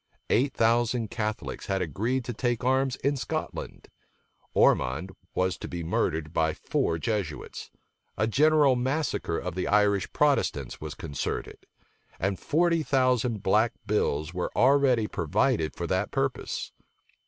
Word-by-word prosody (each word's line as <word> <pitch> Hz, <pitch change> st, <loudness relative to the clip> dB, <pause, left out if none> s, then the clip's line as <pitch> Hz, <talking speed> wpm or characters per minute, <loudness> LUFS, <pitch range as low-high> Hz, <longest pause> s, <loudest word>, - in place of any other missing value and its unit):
Eight 135 Hz, +3 st, +2 dB
thousand 115 Hz, -1 st, +2 dB
Catholics 110 Hz, 0 st, -4 dB
had 95 Hz, -1 st, 0 dB
agreed 115 Hz, -, -1 dB
to 120 Hz, -, -3 dB
take 120 Hz, +1 st, -1 dB
arms 130 Hz, 0 st, +2 dB
in 140 Hz, +2 st, +2 dB
Scotland. 125 Hz, -4 st, -5 dB, 0.7 s
Ormond 80 Hz, +10 st, +3 dB, 0.2 s
was 95 Hz, 0 st, 0 dB
to -, -, -6 dB
be 85 Hz, -1 st, -5 dB
murdered 80 Hz, -1 st, -1 dB
by 80 Hz, -2 st, +1 dB
four 80 Hz, -, -1 dB
Jesuits; 85 Hz, -, -4 dB, 0.5 s
a -, -, +2 dB
general 145 Hz, +3 st, +4 dB
massacre 130 Hz, -, -1 dB
of 90 Hz, -1 st, -4 dB
the 90 Hz, +1 st, -2 dB
Irish 100 Hz, -2 st, +2 dB
Protestants 135 Hz, -, +1 dB
was -, -, -6 dB
concerted; 70 Hz, -3 st, -5 dB, 0.5 s
and 95 Hz, +1 st, -1 dB
forty 170 Hz, +1 st, +2 dB
thousand 125 Hz, -6 st, +1 dB
black 110 Hz, +4 st, +3 dB
bills 80 Hz, -6 st, 0 dB
were 90 Hz, 0 st, -2 dB
already 130 Hz, -3 st, +4 dB
provided 80 Hz, -6 st, 0 dB
for -, -, -3 dB
that -, -, 0 dB
purpose. -, -, -2 dB
110 Hz, 130 wpm, -27 LUFS, 90-130 Hz, 0.7 s, general